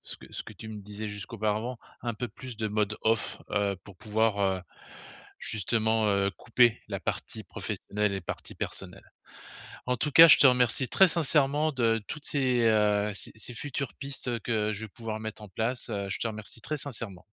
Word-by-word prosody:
ce - - -5
que - - -15
ce - - -5
que 110 - -11
tu 110 - -10
me 110 -1 -7
disais 105 +2 -6
jusqu'auparavant, 110 +4 -2 0.2
un 120 -2 -3
peu 125 +4 -3
plus 125 -1 -8
de 110 0 -2
mode 105 0 0
off, 110 0 0
heu, 100 -1 +1
pour 100 - -13
pouvoir, 110 -1 +1
heu, 95 -2 +1 0.8
justement, 110 +1 +1
heu, 100 -1 +2
couper 120 -1 +3
la - - -3
partie - - -4
professionnelle 105 0 -2
et 95 - -3
partie - - -6
personnelle. - - -4 0.7
En 125 - +1
tout 150 +5 -1
cas 165 +4 +10
je 155 - +10
te - - +7
remercie 125 0 +3
très 190 - +6
sincèrement 150 -2 +2
de 115 -4 +1
toutes 150 -1 -6
ces, 130 -4 +2
heu, 105 -2 +3
ces - - -4
ces 110 +3 -5
futures 130 -2 -4
pistes 135 -4 -3
que 110 -1 0
je 100 - -5
vais 110 - -6
pouvoir 110 +1 -6
mettre 110 0 -6
en 105 - -9
place. 115 +6 -1
Heu, 100 -3 -3
je - - 0
te - - 0
remercie 110 0 -5
très 140 +6 -3
sincèrement! 115 -10 -5
110 Hz, 195 wpm, -29 LUFS, 105-125 Hz, 0.8 s, cas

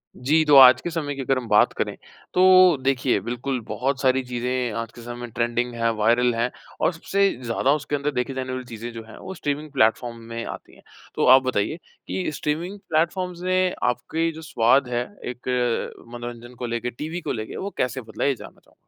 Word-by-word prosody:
जी। 150 +5 +2
तो 150 -1 +5
आज 130 -2 +9
के - - -3
समय 155 -4 -3
की 135 - -5
अगर 135 0 +1
हम 125 -2 -4
बात - - +4
करें - - -1 0.4
तो 185 -2 +7
देखिए 130 -4 +2
बिल्कुल 125 +4 -3
बहुत 135 +1 -1
सारी 130 -1 +3
चीज़ें 125 0 -2
आज 115 0 -7
के 120 - -11
समय 120 0 -6
ट्रेंडिंग 120 +1 -1
है, 115 0 +1
वायरल 120 +3 +3
हैं 120 +2 0 0.3
और - - +2
सबसे 195 +4 +1
ज़्यादा 120 +3 +1
उसके 150 0 -3
अंदर 145 +1 -1
देखी 125 0 -2
जाने 130 -1 -4
वाली 130 0 -5
चीज़ें 120 0 -7
जो 115 -1 -7
है - - -11
वो 190 - -7
स्ट्रीमिंग 150 -3 -3
प्लेटफ़ॉर्म 120 -2 +1
में 115 0 -4
आती - - -9
हैं। - - -20 0.3
तो - - +1
आप 130 - +3
बताइए 130 +2 -1 0.3
कि 185 -4 -2
स्ट्रीमिंग 170 +8 -3
प्लेटफ़ॉर्म्स 175 +2 0
ने 185 0 +2
आपके 160 +7 0
जो 160 0 -10
स्वाद 135 -3 +3
है 120 -1 0 0.3
एक 125 0 -9 0.7
मनोरंजन 120 0 -8
को 125 - -3
लेके 120 +1 -2
टीवी 155 +8 -5
को - - -3
लेके 110 -3 -5
वो 200 - -3
कैसे 125 +1 -1
बदला 110 -2 -6
है 140 - +3
ये 135 - +1
जानना - - -13
चाहूँगा? - - -28
130 Hz, 205 wpm, -24 LUFS, 120-155 Hz, 0.7 s, आज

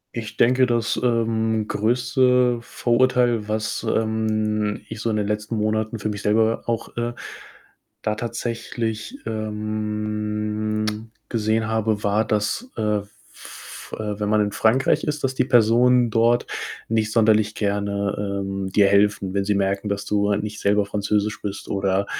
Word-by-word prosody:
Ich 110 -2 -5
denke, 130 +2 +4
das, 120 -2 0
ähm, 115 -2 0
größte 125 +2 +2
Vorurteil, 120 -2 +1
was, 110 0 -2
ähm, 110 -1 0
ich 110 - -7
so 115 - -1
in 110 - 0
den 105 -1 0
letzten 105 +2 -2
Monaten 110 +1 -1
für 105 - -2
mich 100 -1 -4
selber 110 +2 +2
auch, 115 -1 -2
äh, 120 0 -1 0.9
da 105 - -1
tatsächlich, 115 -1 -4
ähm, 105 0 -3 0.2
gesehen 110 -1 0
habe, 110 -1 0
war, 105 +2 +2
dass, 110 - -1
äh, 105 -1 +1 0.3
f - - -11
äh, 105 -1 -4
wenn 105 - -1
man 105 0 +3
in 105 0 0
Frankreich 125 +4 +2
ist, 150 0 -3
dass 135 0 0
die - - +2
Personen 120 0 +4
dort 115 +2 +3 0.4
nicht 110 -1 +1
sonderlich 110 -2 +3
gerne, 100 -1 -1
ähm, 95 0 -3
dir 100 0 +5
helfen. 100 -1 +2
Wenn 100 0 0
sie 105 0 +1
merken, 100 +1 0
dass 100 0 -2
du 100 0 +1
halt 100 0 0
nicht 105 0 -5
selber 100 0 +2
Französisch 105 +1 -1
bist 100 0 -6
oder, 95 0 0
110 Hz, 150 wpm, -23 LUFS, 105-115 Hz, 0.9 s, dir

